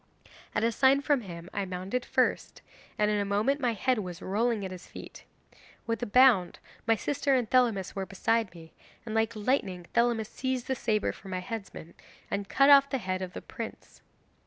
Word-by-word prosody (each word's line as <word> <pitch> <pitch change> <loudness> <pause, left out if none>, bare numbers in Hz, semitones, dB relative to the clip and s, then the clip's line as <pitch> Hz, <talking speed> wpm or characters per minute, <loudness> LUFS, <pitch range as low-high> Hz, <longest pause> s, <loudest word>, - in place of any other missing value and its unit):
At - - +1
a 230 - +3
sign 270 +4 +4
from 285 -2 +1
him 170 -4 -9
I 200 - -1
mounted 190 +6 -3
first, - - 0 0.3
and 210 0 +2
in 210 - +1
a - - +1
moment 210 +8 +1
my 245 -4 +1
head 250 +3 +1
was 180 -3 -6
rolling 215 +1 0
at 190 - -6
his 180 -1 -9
feet. - - -11 0.6
With 230 +1 -2
a 245 - -2
bound 230 -5 +5 0.3
my 225 - +5
sister 280 +3 0
and 245 -3 +1
Thelamis 230 -7 +2
were 195 -1 -3
beside 225 +1 0
me, 160 -1 -13 0.3
and 220 - -5
like 225 +1 +1
lightning 205 -6 -1
Thelamis 235 -2 +2
seized 260 +1 -3
the 265 - -1
sabre 215 -4 0
from 195 - -12
the 185 -1 -2
headsman, 195 -4 -7 0.4
and 200 -1 -3
cut 275 +1 +5
off 280 0 +7
the 270 - 0
head 185 -5 -3
of 180 -1 -5
the - - -7
prince. - - -9
220 Hz, 195 wpm, -29 LUFS, 190-250 Hz, 0.6 s, off